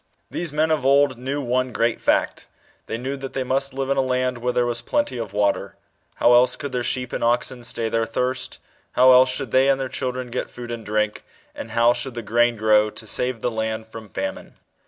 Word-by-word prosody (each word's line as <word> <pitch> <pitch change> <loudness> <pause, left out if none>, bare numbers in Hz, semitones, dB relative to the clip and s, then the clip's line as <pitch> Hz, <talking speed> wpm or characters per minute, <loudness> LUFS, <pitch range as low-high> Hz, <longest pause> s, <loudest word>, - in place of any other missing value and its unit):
These 170 -3 -1
men 155 +2 +1
of 155 -4 +1
old, 135 -2 +3
knew 140 +3 -3
one 130 +1 0
great 115 0 0
fact. - - 0 0.4
They - - -3
knew 130 +3 -4
that 135 -1 -7
they 135 - -1
must 135 +2 +1
live 135 0 -2
in 140 - +1
a - - +4
land, 125 -1 -1
where 125 +1 -1
there 125 0 +1
was 120 -1 0
plenty 290 - -1
of 115 -4 -5
water. 100 -1 0 0.4
How 120 - +4
else 125 +1 +5
could 145 -2 -6
their 125 -1 -1
sheep 125 +1 -1
and - - -2
oxen 120 +1 0
stay 115 -1 +1
their 115 0 0
thirst? 130 +3 -3 0.3
how 130 +1 +6
else 130 +1 +6
should 130 -2 -3
they 130 +1 +4
and 135 -1 +2
their 135 -1 -3
children 125 -1 -4
get - - -3
food 120 -1 -8
and 115 -1 -5
drink? 105 0 -1 0.3
and - - -8
how 115 +1 +3
should 120 +1 -5
the 120 - -5
grain 120 +3 +2
grow 105 0 +3
to 110 - -7
save 125 +1 -1
the 125 - -1
land 110 0 -3
from 110 -1 -10
famine - - -5
125 Hz, 225 wpm, -22 LUFS, 115-130 Hz, 0.4 s, how